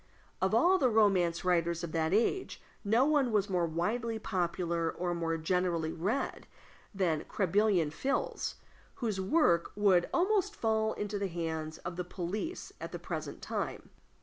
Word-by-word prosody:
Of - - +2
all 375 +2 +5
the 255 - +4
romance 190 -6 +3
writers 170 -1 +1
of 170 - -4
that 160 0 0
age, 235 - +1 0.2
no 225 +5 +3
one 290 -5 +2
was 205 -2 +1
more 175 -2 +2
widely 220 +8 -1
popular 170 -5 -1
or 175 0 -2
more 165 -1 -1
generally 170 -1 0
read 205 +11 -2 0.4
than 180 -6 0
Crebillon 195 -4 +2
fils, 270 - -2 0.4
whose 215 -6 -2
works 190 - +3
would 195 -4 +3
almost 400 +2 +2
fall 220 -1 +1
into 205 0 -3
the 200 - -1
hands 160 -2 -4
of 175 0 -4
the 180 - -1
police 190 - -5
at - - -5
the - - -4
present - - -6
time. - - -4
185 Hz, 150 wpm, -31 LUFS, 170-220 Hz, 0.4 s, all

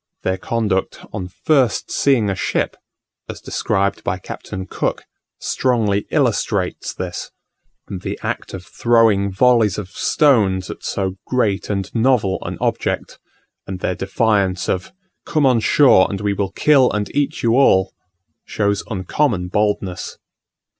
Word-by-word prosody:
Their 95 0 -1
conduct 105 -4 -2
on 95 -3 -4
first 130 +4 +1
seeing 130 -7 +2
a 100 - 0
ship, - - -1 0.5
as - - -6
described 100 +1 -1
by 95 - -1
Captain 95 0 -7
Cook, - - -2 0.4
strongly 110 -6 0
illustrates - - 0
this: - - -5 0.6
the 95 -3 -5
act - - -4
of 90 -1 -9
throwing 110 -3 +2
volleys 115 0 +3
of 100 -3 -5
stones 105 - +2
at - - -10
so 95 -1 -2
great 105 -6 0
and 100 -1 -3
novel 115 -5 +2
an - - -5
object, - - -2 0.5
and 95 -1 -5
their 90 - -1
defiance 95 -1 0
of 90 0 -2 0.3
"Come 155 -3 +1
on 125 -3 +4
shore 120 -4 +5
and 100 - -4
we 105 0 0
will 100 -1 -2
kill 135 +5 +4
and 105 -1 -3
eat 145 -1 -1
you 115 0 +3
all," 95 -8 +4 0.5
shows 100 -1 -1
uncommon 95 -1 -1
boldness. 105 -2 -1
100 Hz, 135 wpm, -19 LUFS, 95-120 Hz, 0.6 s, shore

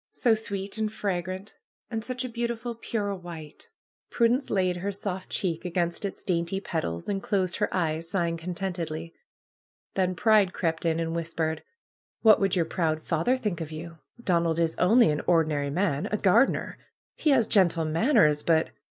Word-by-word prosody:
So 240 -3 +2
sweet 200 -1 -3
and 215 -1 0
fragrant! 190 -1 -3 0.4
And 225 -1 -2
such 255 +1 -3
a - - -4
beautiful 235 0 -3
pure 215 -3 -3
white! 170 -5 -10 0.4
Prudence 245 +3 +2
laid 185 -3 +1
her 195 +3 -2
soft 190 -2 -4
cheek 170 -3 -1
against 175 +1 -1
its 195 - -6
dainty 170 +1 -1
petals, 160 - -3
and 195 -1 -1
closed 185 -4 0
her 210 - 0
eyes, 165 -2 -1
sighing 170 -2 0
contentedly. 170 -2 -4 0.8
Then 185 -1 0
Pride 210 -1 +4
crept 165 0 -1
in 165 0 +1
and 165 0 -2
whispered: 165 -1 -2 0.6
^^What 215 -1 +8
would 195 -2 +2
your 170 -3 +2
proud 160 -2 -1
father 170 +11 +1
think 210 -9 -3
of 160 -1 -5
you? 165 +1 -8 0.2
Don 170 -7 +1
ald 165 -1 0
is 165 -1 +1
only 225 +1 +5
an 150 - -1
ordinary 155 -4 +2
man! 155 -2 0
A 210 - +1
gardener! 215 +7 +2 0.4
He 310 - 0
haa 265 -5 +5
gentle 180 -7 +3
manners, 160 - +3
but! 160 0 +2
180 Hz, 165 wpm, -27 LUFS, 165-210 Hz, 0.8 s, ^^What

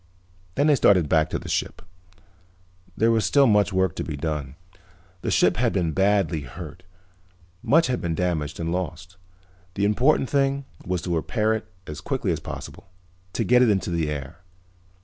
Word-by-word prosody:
Then 145 - +2
they 150 - +5
started 95 - +4
back 80 0 +2
to - - -2
the - - -9
ship. - - -2 1.1
There 115 +1 +3
was 110 -1 +2
still 140 -1 +4
much 105 -4 +3
work 95 -3 +1
to - - -2
be 75 -3 -5
done. 75 -2 -4 0.7
The - - -2
ship - - +3
had 120 -1 +1
been 85 -5 0
badly 95 -3 +1
hurt, 80 +6 -9 0.8
much 165 +3 +4
had 125 -1 -1
been 85 -2 -2
damaged 80 -4 -2
and 85 0 -2
lost. 90 0 -5 0.6
The 100 - +1
important 125 +7 +3
thing 140 0 0 0.2
was 90 -1 -2
to 90 - -2
repair 110 +7 0
it 110 - -4 0.2
as 75 - -7
quickly - - -1
as - - -1
possible, - - -9 0.4
to - - 0
get 125 0 +4
it 125 - +5
into 95 -4 0
the 80 -3 0
air. 70 +2 -6
90 Hz, 175 wpm, -24 LUFS, 80-110 Hz, 1.1 s, they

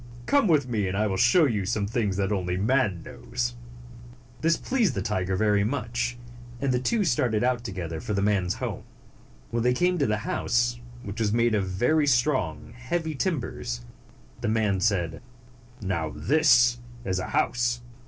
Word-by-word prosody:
Come 285 -6 +3
with 150 -6 +3
me, 105 -5 -1
and 95 +1 -2
I 105 - +2
will 100 -3 -1
show 120 - +5
you 110 -7 0
some 100 +2 -1
things 105 -3 -1
that 100 0 0
only 90 -3 -1
man 105 -4 +1
knows." 120 -1 -4 0.9
This 165 +1 +3
pleased 240 - 0
the - - -6
young - - -1
tiger 95 -4 -1
very 105 0 +2
much, 120 0 -2 0.4
and 140 -1 0
the 125 - +1
two 210 - +1
started 120 -7 +1
out 125 -1 +1
together 85 -7 -5
for 105 - -3
the 100 - +1
man's 100 -4 +1
home. - - -4 0.7
When 115 0 0
they 125 +2 +3
came 180 +4 +1
to 140 - +2
the 105 0 +1
house, 120 0 0 0.2
which 100 +2 -6
was 110 -2 +1
made 115 +1 +2
of 100 -3 +1
very 135 +11 +2
strong, 120 - 0
heavy 160 +6 -2
timbers, 125 - -3 0.6
the - - -1
man 105 -3 +1
said, 90 -5 0 0.6
138 100 - -6
"Now 80 -4 -1
this 125 -5 +4 0.3
is 95 -1 -1
a 95 - -4
house. 120 0 0
115 Hz, 180 wpm, -26 LUFS, 100-125 Hz, 0.9 s, show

